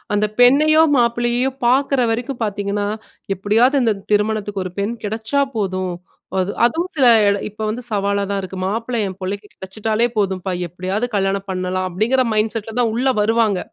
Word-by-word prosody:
அந்த 210 +1 +2 0.2
பெண்ணையோ 305 +5 +6
மாப்பிள்ளையையோ 240 +2 +1 0.2
பாக்குற 270 +1 +2
வரைக்கும் 240 +2 -3
பாத்தீங்கனா 205 0 -2 0.5
"எப்டியாவது 230 +8 +3
இந்த 225 - +3 0.2
திருமணத்துக்கு 210 -2 0
ஒரு 185 - -6
பெண் 210 +4 -1
கிடைச்சா 220 +6 -1 0.2
போதும். 185 -3 -2 0.4
அது 185 +1 0
அதுவும் 325 +10 +1
சில 270 - +3 0.4
இப்ப 210 +1 -10
வந்து 220 +3 -3
சவாலா 200 -1 0
தான் 200 -1 -1
இருக்கு. 190 0 -7
"மாப்பிள்ள 230 +5 -2
என் 190 -1 -5
புள்ளைக்கு 200 +2 -4
கிடைச்சுட்டாலே 215 +4 -1
போதும்பா 190 -2 -1 0.2
எப்படியாவது 185 +6 -3
கல்யாணம் 195 0 0
பண்ணலாம்." 185 0 -2
அப்டிங்கற 230 +8 +1
மைண்ட் 215 +1 +1
செட் 225 -2 -4
ல 220 - -7
தான் 235 -2 +2
உள்ள 250 +4 0
வருவாங்க. 220 -3 +2
215 Hz, 155 wpm, -19 LUFS, 195-240 Hz, 0.5 s, பெண்ணையோ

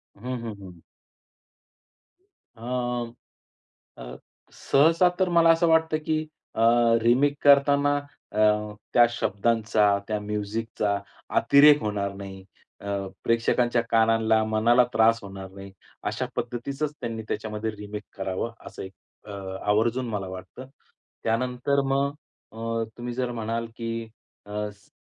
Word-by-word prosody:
हं, 100 - -19 0.2
हं, 115 -2 -5
हं. 90 -3 -12 1.8
अ, 115 - -17 1.4
अ, - - -8 0.4
सहसा 165 +5 +3
तर 185 -1 +2
मला 170 -1 +5
असं 165 +1 +3
वाटतं 160 -1 +3
की 155 0 0 0.3
अ, - - -1 0.4
रिमेक 130 +5 +3
करताना 145 0 +5 0.3
अ, 105 - -3 0.5
त्या 120 -1 +7
शब्दांचा 105 -2 +1
त्या 105 -1 -1
म्युझिकचा 105 0 -2 0.4
अतिरेक 145 +1 +6
होणार 100 -2 -2
नाही. 100 -1 -9 0.4
अ, - - -13 0.4
प्रेक्षकांच्या 115 +1 +2
कानांला, 110 -1 +3
मनाला 110 +3 +4
त्रास 115 +1 +4
होणार 95 -1 -8
नाही. 100 0 -11 0.3
अशा - - -2
पद्धतीचंच 140 +5 -3
त्यांनी 115 -2 -4
त्याच्यामध्ये 110 0 -3
रिमेक 105 0 -7
करावं 95 +4 -3 0.2
असं - - -8
एक 95 - -8 0.4
अ, - - -8 0.4
आवर्जून 115 +4 +1
मला 100 -3 -3
वाटतं. 95 +7 -9 0.6
त्यानंतर 125 +4 0
मग 140 +1 +1 0.4
अ, 115 +1 -3
तुम्ही 120 0 -5
जर 125 0 -2
म्हणाल 115 0 -3
की 115 0 -3 0.4
अ, 105 0 -4
सी 100 0 -26
115 Hz, 120 wpm, -25 LUFS, 105-130 Hz, 1.8 s, त्या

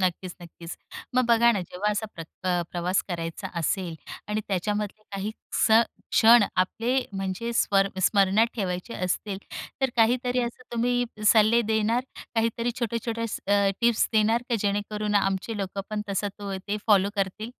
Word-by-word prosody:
नक्कीच, 185 0 -1
नक्कीच. 170 0 -9 0.4
मग 255 0 +4
बघा 235 0 +5
ना 205 - -1
जेव्हा 180 +4 -2
असा 210 +1 -2
प्रत 165 -1 -8 0.2
अ, - - +2 0.2
प्रवास 180 +2 0
करायचा 170 +1 -4
असेल 170 +1 -1 0.3
आणि 210 +1 -1
त्याच्यामधले 205 +2 -2
काही 200 +2 -3 0.3
स - - +3 0.4
क्षण 230 0 +7
आपले 225 +6 0 0.2
म्हणजे 195 +4 -3
स्वर 195 -4 +3
स्मरणात 200 +3 +4
ठेवायचे 185 +1 -3
असतील. 190 +2 -2 0.4
तर 265 -1 +2
काहीतरी 245 +2 +2
असं 240 +1 -5
तुम्ही 245 +1 +1 0.2
सल्ले 220 +2 +5
देणार? 220 +3 +1 0.3
काहीतरी 230 +1 0
छोटे-छोटे 230 0 -2
असं 215 -2 -2
अ, 200 -1 +4
टिप्स 235 -1 +3
देणार 220 +2 +3
का 240 - +1
जेणेकरून 210 +1 -1
आमचे 195 +2 0
लोक 195 -1 -4
पण 210 -1 -2
तसा 200 +1 -1
तो 200 -1 -4
ते 205 - 0
फॉलो 200 -2 +4
करतील? 200 +3 -2
210 Hz, 155 wpm, -26 LUFS, 190-230 Hz, 0.4 s, क्षण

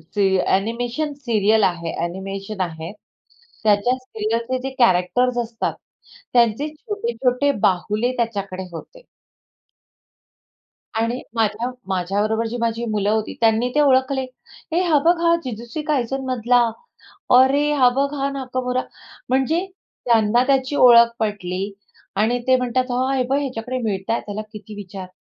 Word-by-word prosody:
जे 205 - +2 0.3
animation 240 +9 -1
serial 220 -2 +3
आहे 170 -3 0
animation 195 +3 -5
आहे. 165 -2 -4 0.7
त्याच्या 215 +3 +3
सीरियलचे 230 0 -3
जे 270 - -2
कॅरेक्टर्स 240 +4 +3
असतात 225 0 -3 0.6
त्यांचे 240 +3 +3
छोटे-छोटे 305 - 0 0.2
बाहुले 210 +6 0
त्याच्याकडे 200 -5 -2
होते. - - -11 2.0
आणि 235 +3 -1
माझ्या 225 +2 0 0.2
माझ्याबरोबर 205 +5 0
जी 235 +2 -4
माझी 230 0 -1
मुलं 205 -1 0
होती, 220 0 -1
त्यांनी 225 +2 +3
ते 300 - +3
ओळखले. 265 -1 +3 0.5
"हे, 340 - +2
हा 330 -5 +3
बघ, 340 +2 +5
हा 335 0 +4
जिजूसी 235 +4 -5
कायझन 270 -2 0
मधला; 245 -1 +2 0.8
अरे, 275 +3 +4
हा 255 -3 +5
बघ, 280 +1 +1
हा 275 -1 -1
नाकमोरा." 255 -2 -2 0.5
म्हणजे 280 +8 +1 0.4
त्यांना 230 0 +4
त्याची 270 +1 +1
ओळख 235 -2 +7
पटली 195 -4 -2 0.5
आणि 220 +4 +2
ते 260 0 +5
म्हणतात, 255 +1 -1
"हां, 260 +2 0
हे 260 - +2
बघ, 275 - +3
ह्याच्याकडे 255 -2 -3
मिळतंय, 205 +1 -1
त्याला 210 +1 -4
किती 210 0 -10
विचार." 195 -2 -8
235 Hz, 130 wpm, -21 LUFS, 210-260 Hz, 2.0 s, ओळख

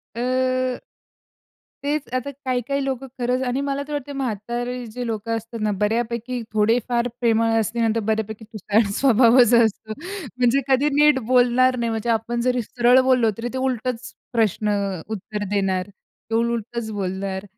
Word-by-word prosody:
अ 255 - 0 1.0
तेच 295 0 -1
आता 255 +2 -2
काही 260 -2 -2
काही 280 0 -1
लोकं 270 0 -3
खरंच 250 +1 0
आणि 250 +2 -1
मला 280 0 -2
तर 300 - -8
वाटतंय 285 -1 -4
म्हातारे 245 0 -3
जे 245 +2 -5
लोकं 225 0 -2
असतात 225 0 -7
ना, 210 - +1
बऱ्यापैकी 235 +3 -1
थोडे 215 +2 +3
फार 240 0 +1
प्रेमळ 230 -1 +3
असली 225 +2 -2
नंतर 225 0 +1
बऱ्यापैकी 220 0 -2
तुटाळ 215 0 +1 0.2
स्वभावच 245 -2 +5
असतो. 220 -2 +2 0.4
म्हणजे 250 +2 +3
कधी 270 +2 +3
नीट 295 -1 +5
बोलणार 255 +1 +4
नाही, 235 -1 -1
म्हणजे 225 +1 -2
आपण 230 +1 0
जरी 250 0 +1
सरळ 245 +3 +4
बोललो 255 -4 +3
तरी 240 +1 -3
ते 260 - -3
उलटच 255 -1 -2 0.2
प्रश्न 215 -2 +1
अ, 200 -4 -1
उत्तर 210 0 -4
देणार, 195 -2 0
ते 220 +2 -11
उलटच 235 0 -1
बोलणार. 190 -1 -3
235 Hz, 155 wpm, -22 LUFS, 220-255 Hz, 1.0 s, स्वभावच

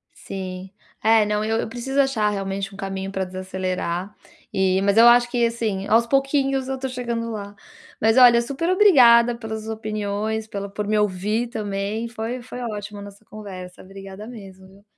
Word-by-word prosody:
Sim. 185 -1 -7 0.3
É, 220 -1 +5
não, 210 0 -1
eu 220 +1 0
eu - - -4
preciso 255 +4 -2
achar 260 -6 +2
realmente 195 0 -4
um - - -11
caminho 195 0 -4
pra 190 -1 -1
desacelerar 185 0 -4 0.4
e 190 0 +2
mas 200 +1 +2
eu 230 +1 +8
acho 240 0 +6
que 240 -1 +2
assim, 220 -4 -2
aos 230 +2 +3
pouquinhos 275 0 +1
eu 265 - -1
estou 265 0 -4
chegando 235 -2 -3
lá, 205 -2 -6 0.5
mas 225 +2 +3
olha, 240 -2 +7
superobrigada 270 - +5
pelas 220 -1 -6
opiniões, 215 0 -3
pela, 200 -2 -5
por 205 +1 -5
me 215 0 +1
ouvir 210 +4 0
também. 210 0 -3
Foi 235 +2 -5
foi 250 +1 -8
ótimo 210 -2 -6
nossa 200 +1 -12
conversa. 185 -4 -10
Obrigada 195 +2 -10
mesmo, 195 -5 -11
viu. 195 +2 -20
215 Hz, 170 wpm, -22 LUFS, 195-235 Hz, 0.5 s, eu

